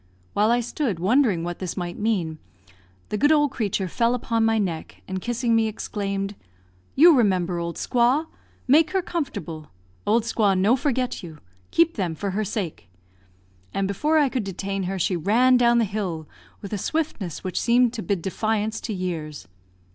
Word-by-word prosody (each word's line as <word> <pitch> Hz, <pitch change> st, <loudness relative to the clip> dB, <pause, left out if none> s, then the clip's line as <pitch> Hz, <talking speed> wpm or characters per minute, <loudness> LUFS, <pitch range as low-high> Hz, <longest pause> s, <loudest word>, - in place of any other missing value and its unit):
While 210 Hz, +2 st, +3 dB
I 240 Hz, +1 st, +3 dB
stood 240 Hz, -, -2 dB
wondering 200 Hz, -1 st, +2 dB
what 175 Hz, 0 st, -4 dB
this 185 Hz, -1 st, -4 dB
might 175 Hz, -1 st, -3 dB
mean, 185 Hz, -8 st, -1 dB, 0.7 s
the 210 Hz, -, -2 dB
good 290 Hz, +2 st, +4 dB
old 295 Hz, -3 st, +4 dB
creature 200 Hz, -6 st, -1 dB
fell 230 Hz, +7 st, +1 dB
upon 230 Hz, -2 st, 0 dB
my 225 Hz, 0 st, +3 dB
neck, 175 Hz, -6 st, -3 dB
and 190 Hz, -1 st, -4 dB
kissing 240 Hz, +1 st, 0 dB
me, 225 Hz, -1 st, +3 dB
exclaimed, 200 Hz, -2 st, -3 dB, 0.6 s
"You 330 Hz, +3 st, +8 dB
remember 185 Hz, -7 st, +2 dB
old 170 Hz, 0 st, -4 dB
squaw 250 Hz, +6 st, +2 dB, 0.4 s
make 310 Hz, +5 st, +4 dB
her 380 Hz, -2 st, +1 dB
comfortable! 170 Hz, -, -5 dB, 0.4 s
Old 225 Hz, +2 st, +3 dB
squaw 210 Hz, -4 st, +2 dB
no 205 Hz, +6 st, +4 dB
forget 255 Hz, -2 st, -1 dB
you. 165 Hz, -4 st, -10 dB, 0.3 s
Keep 335 Hz, 0 st, +2 dB
them 175 Hz, -5 st, -1 dB
for 200 Hz, +4 st, -3 dB
her 210 Hz, +3 st, -1 dB
sake," 180 Hz, -, -4 dB, 0.9 s
and 195 Hz, 0 st, +1 dB
before 300 Hz, +11 st, +1 dB
I 295 Hz, -2 st, +4 dB
could 255 Hz, -3 st, -2 dB
detain 195 Hz, 0 st, -3 dB
her 195 Hz, -, -2 dB
she 180 Hz, +1 st, 0 dB
ran 230 Hz, +9 st, +4 dB
down 240 Hz, -1 st, +4 dB
the 230 Hz, -, +3 dB
hill 185 Hz, -7 st, -4 dB, 0.4 s
with 200 Hz, -, -6 dB
a 205 Hz, -, -2 dB
swiftness 225 Hz, -, -3 dB
which 185 Hz, -2 st, -2 dB
seemed 240 Hz, 0 st, +3 dB
to 230 Hz, -, -4 dB
bid 200 Hz, -5 st, -2 dB
defiance 215 Hz, +2 st, -1 dB
to 225 Hz, -, -4 dB
years. 165 Hz, -5 st, -5 dB
210 Hz, 175 wpm, -24 LUFS, 185-245 Hz, 0.9 s, You